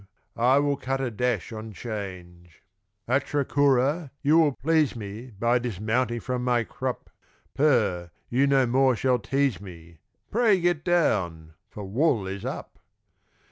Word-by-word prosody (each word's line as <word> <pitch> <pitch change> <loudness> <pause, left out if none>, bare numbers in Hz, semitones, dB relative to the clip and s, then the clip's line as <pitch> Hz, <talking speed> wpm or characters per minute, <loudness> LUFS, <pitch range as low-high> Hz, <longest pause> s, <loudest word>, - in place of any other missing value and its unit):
I 125 +4 +3
will 145 0 +1
cut 135 0 -2
a 130 -2 -2
dash 115 -3 -2
on 110 0 -7
'Change. 90 -6 -8 0.4
Atra 140 +3 0
Cura, 140 +3 +2
you 155 +3 +5
will 150 -4 +3
please 155 -2 +1
me 110 +2 -7
By 120 +3 +2
dismounting 120 +1 -1
from 125 -1 -3
my 120 -1 +2
crup 130 +2 -5 0.4
Per 110 - +1 0.2
you 135 +3 +2
no 135 -2 +4
more 130 +1 +3
shall 125 +1 +1
tease 135 -7 0
me, 85 -4 -12 0.3
Pray 220 -4 +3
get 175 -3 0
down 90 - 0 0.2
for 105 - -8
wool 115 0 +1
is 95 +1 -6
up! - - -6
125 Hz, 140 wpm, -26 LUFS, 105-140 Hz, 0.4 s, you